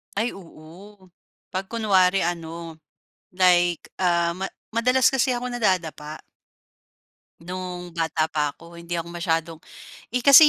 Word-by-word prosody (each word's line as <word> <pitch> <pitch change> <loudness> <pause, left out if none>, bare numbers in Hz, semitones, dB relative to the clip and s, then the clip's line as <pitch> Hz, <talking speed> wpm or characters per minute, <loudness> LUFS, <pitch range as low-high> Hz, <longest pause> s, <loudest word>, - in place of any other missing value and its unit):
Ay 225 +4 +1
oo, 185 +2 -13 0.4
'pag 190 +1 -3
kunwari 195 -4 +3
ano, 165 -1 -4 0.5
like, 175 -2 +3 0.2
ah, 170 -1 +2
ma 190 +2 -4 0.2
madalas 250 +2 +4
kasi 265 0 +3
ako 245 0 -1
nadadapa. 180 -10 -1 1.2
No'ng 180 0 -6
bata 160 -1 +1
pa 150 -2 0
ako 170 +2 -14
hindi 170 0 -6
ako 170 0 -2
masyadong, 165 -2 -1 0.5
eh, 250 0 -2
kasi 280 +2 +10
180 Hz, 120 wpm, -24 LUFS, 165-205 Hz, 1.2 s, kasi